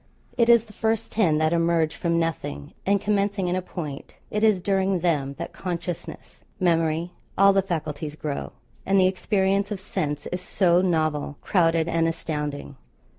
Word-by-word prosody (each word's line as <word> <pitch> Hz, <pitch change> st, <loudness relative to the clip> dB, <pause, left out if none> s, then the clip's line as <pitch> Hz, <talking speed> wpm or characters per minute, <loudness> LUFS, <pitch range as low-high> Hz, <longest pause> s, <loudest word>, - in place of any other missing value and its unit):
It 235 Hz, -1 st, +3 dB
is 235 Hz, -1 st, +6 dB
the 215 Hz, -, -16 dB
first 220 Hz, +1 st, -1 dB
ten 175 Hz, -9 st, +2 dB
that 155 Hz, +1 st, +2 dB
emerge 165 Hz, -2 st, +2 dB
from 170 Hz, -1 st, 0 dB
nothing, 160 Hz, -, -3 dB
and 200 Hz, 0 st, +4 dB
commencing 200 Hz, -1 st, 0 dB
in 175 Hz, -, 0 dB
a 185 Hz, -, 0 dB
point, 155 Hz, -6 st, -7 dB
it 210 Hz, +1 st, -1 dB
is 215 Hz, -4 st, +4 dB
during 190 Hz, -1 st, +1 dB
them 145 Hz, -6 st, 0 dB
that 170 Hz, +2 st, -6 dB
consciousness, 175 Hz, -2 st, -6 dB, 0.2 s
memory 165 Hz, -1 st, +1 dB, 0.3 s
all 195 Hz, 0 st, +6 dB
the 195 Hz, -, +4 dB
faculties 155 Hz, -5 st, -4 dB
grow, 150 Hz, -2 st, -4 dB, 0.3 s
and 195 Hz, 0 st, +3 dB
the 185 Hz, -, +5 dB
experience 195 Hz, +1 st, +1 dB
of 205 Hz, -3 st, -4 dB
sense 150 Hz, -6 st, -3 dB
is 180 Hz, 0 st, -3 dB
so 180 Hz, -1 st, +3 dB
novel, 155 Hz, -5 st, 0 dB
crowded, 165 Hz, -3 st, +2 dB
and 165 Hz, -1 st, +1 dB
astounding. 150 Hz, -, -4 dB
175 Hz, 165 wpm, -25 LUFS, 155-195 Hz, 0.3 s, is